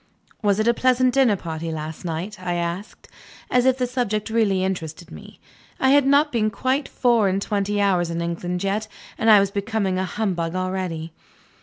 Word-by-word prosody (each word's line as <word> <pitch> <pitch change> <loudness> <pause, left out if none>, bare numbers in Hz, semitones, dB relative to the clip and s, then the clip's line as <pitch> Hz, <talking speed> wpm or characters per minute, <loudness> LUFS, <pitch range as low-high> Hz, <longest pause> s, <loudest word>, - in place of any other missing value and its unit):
"Was 205 -1 +2
it 215 - +1
a 235 - +5
pleasant 255 +1 +2
dinner 260 -6 +4
party 165 -2 -5
last 155 +1 -6
night?" 175 +4 -4
I 175 -1 -2
asked 175 +5 -5 0.4
as 250 +1 +3
if 260 0 +3
the 250 - 0
subject 235 -4 -2
really 205 -5 +2
interested 170 -3 -4
me. - - -12 0.4
I 265 - +3
had 285 -1 +5
not 290 +2 +4
been 215 -3 +1
quite 260 +5 -1
four 235 -5 +2
and 190 +1 0
twenty 205 0 -1
hours 185 -4 +2
in 170 0 -3
England 175 +2 -3
yet, 205 +2 -1 0.3
and 225 - +2
I 210 -2 +9
was 200 0 +1
becoming 200 -2 -1
a 190 - 0
humbug 180 -4 -2
already. 185 -3 -3
200 Hz, 185 wpm, -22 LUFS, 175-230 Hz, 0.4 s, I